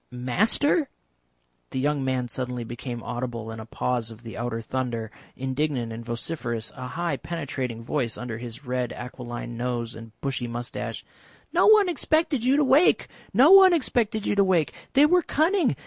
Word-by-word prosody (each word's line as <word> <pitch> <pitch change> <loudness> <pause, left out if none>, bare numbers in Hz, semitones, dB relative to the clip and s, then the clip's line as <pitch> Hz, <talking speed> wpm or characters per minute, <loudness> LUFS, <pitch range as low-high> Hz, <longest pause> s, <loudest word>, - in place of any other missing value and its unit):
Master?" 215 - +1 0.8
The 130 - -3
younger 145 0 0
man 130 -2 -1
suddenly 125 -1 -4
became 120 0 -6
audible 120 -2 -4
in 110 - -7
a 110 - -9
pause 120 0 -1
of 115 +1 -12
the 115 - -8
outer 120 -1 -3
thunder, 115 -2 -3 0.2
indignant 130 -3 -2
and 115 +1 -7
vociferous, 120 -1 -3
a 130 -2 -6
high 170 0 -2
penetrating 130 -7 -4
voice 120 -2 -1
under 120 -2 -5
his 120 +3 -8
red 125 -1 -2
aquiline 120 -1 -7
nose 120 -1 -2
and 115 -1 -12
bushy 135 -3 -2
moustache. 120 +1 -5 0.5
"No - - +4
one 425 -2 +7
expected 315 -6 +1
you 260 +2 +4
to 300 - +4
wake. 275 +6 +4 0.2
No 260 - +6
one 385 -2 +9
expected 235 -8 0
you - - +1
to 200 -1 +4
wake. 180 -5 +2 0.2
They 285 +1 +7
were 355 +4 +4
cunning. 325 - +2
130 Hz, 165 wpm, -25 LUFS, -, 0.8 s, one